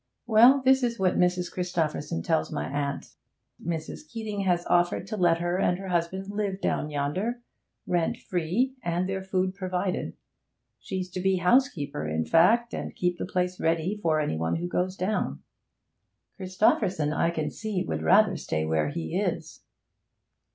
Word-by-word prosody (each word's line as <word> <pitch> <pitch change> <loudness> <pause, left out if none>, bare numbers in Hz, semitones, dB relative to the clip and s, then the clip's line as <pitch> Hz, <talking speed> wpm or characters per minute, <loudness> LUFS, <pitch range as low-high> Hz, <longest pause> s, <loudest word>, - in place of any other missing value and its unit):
Well, 240 +4 +6
this 265 0 +5
is 235 -2 0
what 185 -3 +1
Mrs. 180 0 +1
Christopherson 160 - -2
tells - - 0
my 75 - -2
aunt, 140 - -3 0.5
Mrs. 170 - -5
Keeting 220 -3 -4
has 175 -2 +1
offered 175 +1 +2
to 220 - -5
let 175 -4 +3
her 175 +2 -1
and 180 -2 +2
her 190 0 -7
husband 185 +3 -1
live 205 -2 -2
down 150 - -1
yonder, 185 +12 -2 0.4
rent 175 -2 0
free, 185 +10 -1
and 175 +2 -1
their 190 0 -2
food 185 -1 0
provided. 185 -1 -2 0.7
She's 185 -2 -4
to 185 - -4
be 190 +1 +2
housekeeper, 180 - +1
in 80 +1 -1
fact, 225 - +4
and - - -5
keep 180 -1 -1
the - - -3
place 180 0 -1
ready 165 +4 0
for 160 -3 +2
any 145 - -1
one 80 +1 0
who 175 +1 -2
goes 180 +1 -1
down.' 200 +4 -2 0.9
'Christopherson, 185 -5 +1
I 165 - +2
can 155 -3 -2
see, 210 -4 -3
would - - -3
rather 200 +1 +5
stay 80 0 -2
where 80 -1 +1
he 80 +1 -4
is.' - - -3
180 Hz, 160 wpm, -27 LUFS, 165-195 Hz, 0.9 s, Well